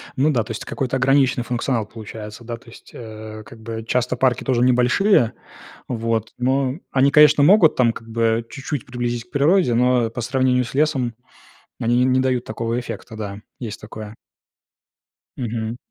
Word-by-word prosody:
Ну 145 +4 +3
да, 120 -6 +1
то 110 - -8
есть 110 - -6
какой-то 130 0 -2
ограниченный 135 -2 +3
функционал 120 -2 -1
получается, 110 0 -9
да, 115 0 -5
то 115 - -18
есть. - - -15
Э, 110 -1 -9
как 115 0 -14
бы 110 0 -6
часто 125 0 0
парки 125 0 +1
тоже 125 -2 +1
небольшие, 125 - +3 0.5
вот, 115 -2 -2
но 130 +3 0
они, 135 +1 +3
конечно, 150 -1 +6
могут, 175 0 +6
там, 120 -2 +3
как 115 - -11
бы 115 0 +1
чуть-чуть 140 -2 -5
приблизить 120 -1 -3
к - - -38
природе, 145 -1 +3
но 125 -1 +3
по 120 +1 -5
сравнению 125 +1 +1
с 120 - -9
лесом 135 -5 +1 0.7
они 120 +2 +2
н 130 - +2
не 130 - +3
дают 130 -2 0
такого 115 +2 -2
эффекта, 120 -1 -8
да, 100 -2 -6 0.2
есть 110 -4 -6
такое. 105 0 -9 1.2
Мгм. 115 -2 -3
120 Hz, 170 wpm, -21 LUFS, 115-130 Hz, 1.2 s, конечно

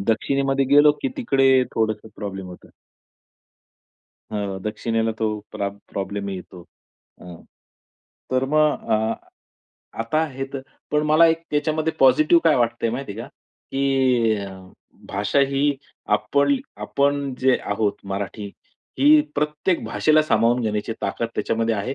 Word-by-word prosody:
दक्षिणेमध्ये 135 +6 +1
गेलो, 145 +1 +7
की 275 - +1
तिकडे 135 - +3
थोडंसं 110 -1 -1
प्रॉब्लेम 95 -2 -6
होतो. 90 - -13 1.6
हां, 100 -2 -3
दक्षिणेला 115 +1 -1
तो 110 - +1 0.2
प्रॉ 100 - -2 0.2
प्रॉब्लेम 100 0 -4
येतो. 95 -1 -8 0.6
हां, 90 -1 -10 1.0
तर 130 +1 +2
मग 155 -1 +2
अ, 110 +1 +1 0.9
आता 155 +8 0
हे 135 -1 -5
तर 135 - -4 0.3
पण 150 0 +2
मला 160 +2 +6
त्याच्यामध्ये 160 -1 -1
पॉझिटिव्ह 155 +6 +5
काय 160 - +5
वाटतंय, 115 -1 0
माहिती 125 -2 -5
आहे 110 - -8
का, - - -8 0.5
की 130 -5 +2 0.7
भाषा 105 +7 0
ही 140 +1 +1 0.4
आपण 140 0 +1 0.2
आपण 140 +4 0
जे 130 0 +3
आहोत, 100 0 0
मराठी 100 +1 -4 0.5
ही 150 +3 +7
प्रत्येक 150 +4 -1
भाषेला 155 0 +3
सामावून 120 -3 +2
घेण्याची 105 0 -2
ताकद 115 - -2
त्याच्यामध्ये 115 0 0
आहे. 110 +6 -3
130 Hz, 125 wpm, -22 LUFS, 110-145 Hz, 1.6 s, गेलो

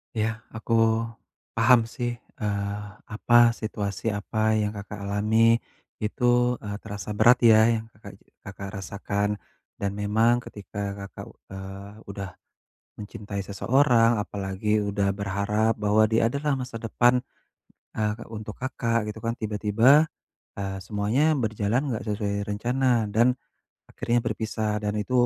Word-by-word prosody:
Ya 110 0 -1
aku 115 +1 -2 0.8
paham 115 0 +5
sih, 120 +1 -3 0.3
eee, 100 0 -2 0.2
apa, 120 +2 +4
situasi 105 0 -3
apa 110 +2 0
yang 105 0 -1
Kakak 100 0 -7
alami 110 +3 +3 0.5
itu, 125 +2 +2
eee, 105 -1 -5
terasa 105 +1 -6
berat 120 +4 +6
ya 110 -2 +7 0.2
yang 110 - -9
Kakak - - -12
je - - -31 0.2
Kakak 95 0 -7
rasakan 100 +1 -2 0.5
dan 100 -1 -1
memang 110 +4 +2
ketika 100 0 -6 0.2
Kakak, - - -10 0.3
eee, 95 +1 -8 0.2
udah 100 -1 -6 0.7
mencintai 100 -1 -6
seseorang 120 +2 +3
apalagi 100 +1 -1
udah 100 -1 0
berharap 100 +3 0
bahwa 105 +1 +3
dia 115 +1 +2
adalah 140 0 0
masa 125 -3 -6
depan, 120 +2 +3 0.7
eee, 105 +1 -2
untuk 105 -1 -7
Kakak, 115 -3 -1
gitu 110 - -11
kan, 115 +1 -2
tiba-tiba, 110 +8 +4 0.4
eee, 95 -1 -4
semuanya 110 +10 +1
berjalan 110 -3 0 0.2
nggak - - -6
sesuai 100 -1 -2
rencana 120 +2 +1
dan 120 +4 +4 0.5
akhirnya 120 0 -1
berpisah, 110 -2 -2
dan 105 0 -2
itu 105 +4 -3
110 Hz, 130 wpm, -26 LUFS, 100-115 Hz, 0.8 s, ya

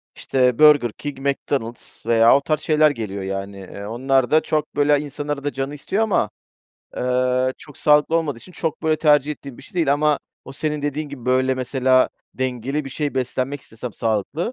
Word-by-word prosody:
işte, 125 -2 +1
Burger 145 -7 +6
King, 145 +1 -7
McDonald’s 135 -5 -3
veya 115 +2 +6
o - - -2
tarz 155 0 0
şeyler 155 -1 +3
geliyor. 100 -6 -5
Yani, 95 +1 -4
eee, 100 +2 -9
onlar 130 +4 +1
da 155 0 +5
çok, 155 -1 -2
böyle, 145 0 +3
insanın 145 0 -6
arada 145 -1 -2
canı 135 +2 -4
istiyor 195 +9 -1
ama, 215 - +1 0.7
eee, 125 +1 +1
çok 150 - -12
sağlıklı 150 +2 +4
olmadığı 150 -7 -1
için 180 - -13
çok, 160 -2 -3
böyle, 155 -1 +2
tercih 150 -1 +3
ettiğim 140 -3 -10
bir - - -12
şey - - -14
değil. 160 -5 +2
Ama 150 0 +2 0.3
o 135 - -9
senin 150 +1 -3
dediğin 145 +1 -2
gibi, 135 -4 -9
böyle, 130 +1 +2
mesela 130 0 +2 0.3
dengeli 130 +3 -2
bir 135 - -7
şey 145 0 -3
beslenmek 130 +2 -2
istesem, 115 -1 -8
sağlıklı, 115 - -2
135 Hz, 185 wpm, -21 LUFS, 125-150 Hz, 0.7 s, Burger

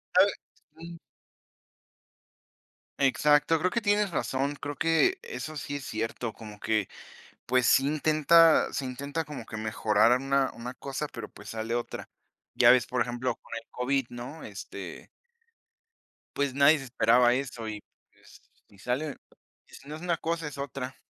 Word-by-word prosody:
A - - +7
ver, - - 0 0.5
mm. 170 0 -9 2.0
Exacto, 150 +3 +3
creo 180 +4 +1
que 235 - 0
tienes 205 -1 +2
razón, 140 -3 -1
creo 145 0 -5
que 165 - +2
eso 470 - -6
sí 145 -1 -5
es 140 -2 -5
cierto, 115 -1 -3
como 105 -1 -11
que, 110 -3 0 0.6
pues, 125 -1 +2
sí 135 - +5
intenta, 155 +2 +4
se 135 - -3
intenta 140 +5 -4
como 145 -6 -7
que 110 - -7
mejorar 110 +2 +3
una 135 0 +1
una 120 +2 -6
cosa, 135 +3 -5
pero, 115 -2 -7
pues, - - -12
sale 110 +1 -3
otra. 120 0 -4 0.5
Ya 120 -1 +6
ves, 125 0 +5
por 125 -1 0
ejemplo, 120 0 -2
con - - -21
el 115 0 -7
COVID, 135 +1 0
¿no?, 125 +6 -8
este - - -8 1.3
pues, 140 -2 0
nadie 140 +3 +6
se 135 - -7
esperaba 120 -1 +4
eso. 125 -3 -4
Y, 105 -1 -5 0.3
pues, - - -19 0.3
si 100 - -20
sale, 130 +8 -2 0.5
y - - -23
si 140 - -13
no 150 - -5
es 160 - -10
una 175 -2 0
cosa, 165 -1 -2
es 145 -1 -8
otra. 135 -2 -5
135 Hz, 160 wpm, -28 LUFS, 120-150 Hz, 2.0 s, A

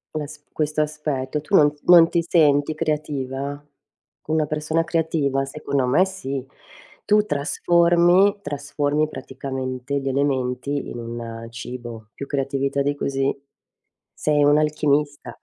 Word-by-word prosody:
Ma 150 -1 -2
s 150 0 -12
questo 155 0 0
aspetto. 150 -2 -2
Tu 195 +6 0
non 145 -4 +5
non 170 -2 +8
ti 170 - +1
senti 150 -3 +3
creativa? 145 -2 -3 0.7
Una 155 0 +1
persona 155 +2 -1
creativa? 160 -5 0
Secondo 140 -1 -2
me 145 +10 +4
sì. 135 -9 -5 0.6
Tu 210 0 +4
trasformi 175 +5 +3
trasformi 145 0 -1
praticamente 130 0 -4
gli 135 - -5
elementi 135 0 -1
in - - -7
un 115 -1 -6
cibo, 120 -2 -8
più 140 - -7
creatività 140 0 -1
di 145 +1 0
così. 135 -1 -1 0.8
Sei 150 -1 +1
un'alchimista. 150 0 +1
145 Hz, 120 wpm, -22 LUFS, 135-155 Hz, 0.8 s, non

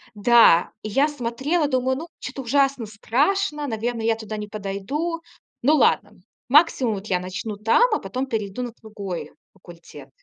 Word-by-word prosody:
Да, 210 -5 +5
и 215 - -5
я 275 +8 +3
смотрела, 290 +4 -1
думаю: 260 -1 0
"Ну, 330 +3 -7
чё-то 270 +1 -6
ужасно 270 -1 +1
страшно. 295 - 0
Наверное, 230 0 -3
я 225 -1 +3
туда 220 -1 -7
не 210 0 -5
подойду". 215 - -4 0.4
Ну 295 +6 +4
ладно, 210 -6 +2 0.4
максимум 270 -6 +4
вот 195 +2 -8
я 180 -1 +1
начну 185 +4 -5
там, 225 - +3
а - - +1
потом 255 +1 -4
перейду 220 0 -3
на 240 -2 -6
другой 200 -5 -6 0.2
факультет. 170 -6 -14
230 Hz, 160 wpm, -23 LUFS, 205-275 Hz, 0.4 s, Да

